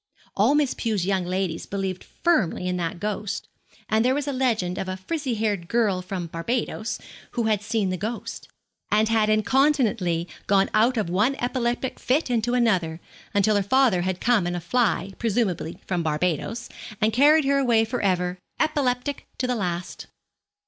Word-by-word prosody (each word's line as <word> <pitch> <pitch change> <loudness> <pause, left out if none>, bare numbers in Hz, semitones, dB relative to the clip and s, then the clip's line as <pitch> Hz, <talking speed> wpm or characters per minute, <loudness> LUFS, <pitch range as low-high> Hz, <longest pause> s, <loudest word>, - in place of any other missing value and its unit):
All 225 +9 +4
Miss 295 -3 +2
Pew's 215 -6 -1
young 190 -2 0
ladies 180 -2 -2
believed 190 -2 -3
firmly 235 - 0
in 180 - 0
that 170 0 -3
ghost; 210 +1 -3 0.4
and 220 +1 +2
there 255 +2 +3
was 290 0 -2
a 285 - -1
legend 225 -9 0
of 190 - -3
a 185 - -3
frizzy 265 - -3
haired 205 -5 -1
girl 210 -4 +1
from 180 -1 -4
Barbados 220 +6 -2 0.4
who 240 - 0
had 215 -2 +1
seen 210 -2 0
the 185 - -2
ghost, 220 +5 -5 0.4
and 215 +1 +3
had 220 -1 +3
incontinently 215 - +2 0.2
gone 195 -1 +3
out 230 +4 +3
of 215 - 0
one 210 +10 +2
epileptic 245 -1 -2
fit 265 +1 +1
into 240 +1 +1
another, 185 -9 +1 0.4
until 205 +1 +3
her 205 - +3
father 225 -2 +3
had 185 0 -2
come 230 -7 +2
in 175 - -2
a - - -2
fly 195 +1 0
presumably 205 -8 -1
from 180 -2 -1
Barbados 170 +8 -1 0.3
and 215 0 +2
carried 295 +5 +5
her 275 0 +3
away 235 -4 +3
for 245 +2 -3
ever, 180 -2 0 0.2
epileptic 280 -3 0
to 255 - -1
the 250 - 0
last. 180 -5 -4
215 Hz, 170 wpm, -24 LUFS, 185-245 Hz, 0.4 s, carried